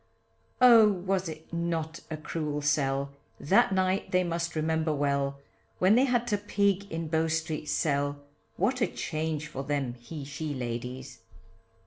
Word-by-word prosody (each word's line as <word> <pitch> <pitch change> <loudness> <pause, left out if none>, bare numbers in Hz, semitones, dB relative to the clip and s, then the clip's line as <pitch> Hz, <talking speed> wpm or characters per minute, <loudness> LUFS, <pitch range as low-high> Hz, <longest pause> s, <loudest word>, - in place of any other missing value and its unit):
Oh, 230 -4 +8
was 185 -1 -1
it 155 +1 -10
not 165 -1 -2
a 155 - -4
cruel 150 -1 -3
sell, 140 -1 +1 0.3
That 190 +6 +4
night 190 0 +1
they 185 0 +2
must 170 -1 -2
remember 160 0 0
well, 140 -1 0 0.4
When 185 +3 +4
they 250 +4 +5
had 245 -2 +1
to 205 - +1
pig 200 -1 0
in 165 0 -3
Bow 160 +1 +1
Street 160 -1 -2
cell, 145 -2 0 0.4
What 250 +7 0
a - - +4
change 155 -1 -3
for 135 -3 -6
them 140 -3 -1
he 135 +5 -8
she 145 +1 -4
ladies. 125 +1 -5
160 Hz, 150 wpm, -28 LUFS, 145-185 Hz, 0.4 s, Oh